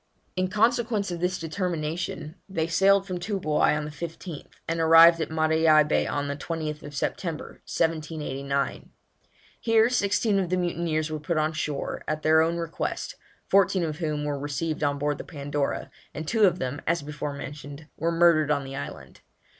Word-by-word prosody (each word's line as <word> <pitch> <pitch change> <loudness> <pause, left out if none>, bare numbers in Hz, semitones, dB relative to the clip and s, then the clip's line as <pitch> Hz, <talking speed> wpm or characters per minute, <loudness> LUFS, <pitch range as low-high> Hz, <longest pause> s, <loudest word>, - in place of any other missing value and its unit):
In 185 0 +1
consequence 220 0 +1
of 175 - -4
this 180 +1 0
determination 165 -2 -3 0.2
they 165 -4 -1
sailed 195 +4 +4
from 185 -2 -4
Toobouai 175 -6 +1
on 150 - -3
the 150 - -6
15th, 165 +1 -7 0.2
and 165 0 -1
arrived 165 +1 +7
at - - -2
Matavai 160 -1 +4
Bay - - +1
on 145 0 -2
the 140 - -2
20th 150 -1 -5
September, 155 +3 -4
1789. 150 -4 -2 0.7
Here 225 +1 +3
sixteen 205 -2 +2
of 185 -3 -1
the 185 - +1
mutineers 165 -3 -1
were 155 - -3
put 155 +2 -2
on 155 +1 +1
shore, 150 -2 -3
at 155 0 -2
their 160 0 +5
own 165 +1 +1
request, 165 -1 -3 0.3
fourteen 190 -2 +3
of 155 -1 -3
whom 150 -3 -2
were 145 -1 -2
received 150 +2 -3
on 145 -1 +1
board 145 0 -1
the - - -5
Pandora, 145 -2 -3 0.2
and 155 0 -5
two 220 +1 +4
of 180 -2 +3
them, 140 -2 -3
as 170 -1 +1
before 150 0 -5
mentioned, 145 +1 -8
were 165 +2 0
murdered 165 -3 +4
on 140 -2 +1
the 135 0 -7
island. - - -8
160 Hz, 170 wpm, -26 LUFS, 150-175 Hz, 0.7 s, arrived